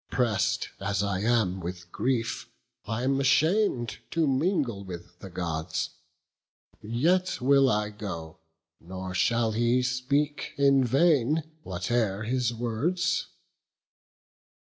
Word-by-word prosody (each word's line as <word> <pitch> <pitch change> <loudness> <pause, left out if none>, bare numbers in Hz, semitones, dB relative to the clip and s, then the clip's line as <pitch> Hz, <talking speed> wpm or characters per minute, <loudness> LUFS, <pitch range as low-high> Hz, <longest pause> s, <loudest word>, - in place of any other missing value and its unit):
Press'd 105 -5 0
as 100 0 -1
I 100 -2 -1
am 105 -4 +1
with 90 0 -7
grief, 120 -3 -1 0.4
I 115 +2 -2
am 135 +1 +1
asham'd 140 - +2
To 165 -1 +1
mingle 135 - 0
with 90 -1 -9
the 95 - -9
Gods; 80 -3 -3 0.9
yet 165 - +1
will 135 +1 +4
I 105 -1 0
go: 85 -7 -7 0.4
Nor 95 +2 -7
shall 115 +3 +2
he 120 +3 +2
speak 140 +4 -1
in 140 -1 +5
vain, 145 +2 +3 0.2
whate'er 100 - -1
his 125 +1 0
words." 160 +10 -1
120 Hz, 110 wpm, -27 LUFS, 100-135 Hz, 0.9 s, in